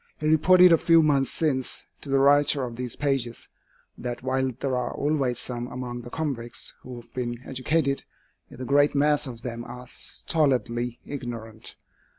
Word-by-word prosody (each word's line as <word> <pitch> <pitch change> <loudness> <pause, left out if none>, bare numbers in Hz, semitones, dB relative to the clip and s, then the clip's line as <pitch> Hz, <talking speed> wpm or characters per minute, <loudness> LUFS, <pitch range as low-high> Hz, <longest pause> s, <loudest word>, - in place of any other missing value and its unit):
He 155 - -4
reported 180 +3 +7
a 165 - +5
few 165 -1 +5
months 140 -3 +3
since 135 -5 -1 0.2
to 145 - -8
the 135 - +3
writer 140 0 +4
of 120 -2 -5
these 125 -1 -4
pages, 135 -5 -1 0.5
that 120 0 -5
while 130 0 +1
there 130 +2 -2
are 125 -1 -2
always 140 -5 0
some 120 -1 -3
among 125 -1 -5
the 120 - -9
convicts 125 -6 -3
who 125 -1 -8
have 120 - -18
been 120 -1 -3
educated, 140 +2 0 0.5
yet - - -12
the 130 - -5
great 145 +2 +3
mass 150 +1 +3
of 120 -2 -8
them 120 -1 -4
are 125 +1 -9
stolidly 125 -4 -1
ignorant. 115 -5 -6
130 Hz, 165 wpm, -26 LUFS, 120-145 Hz, 0.5 s, reported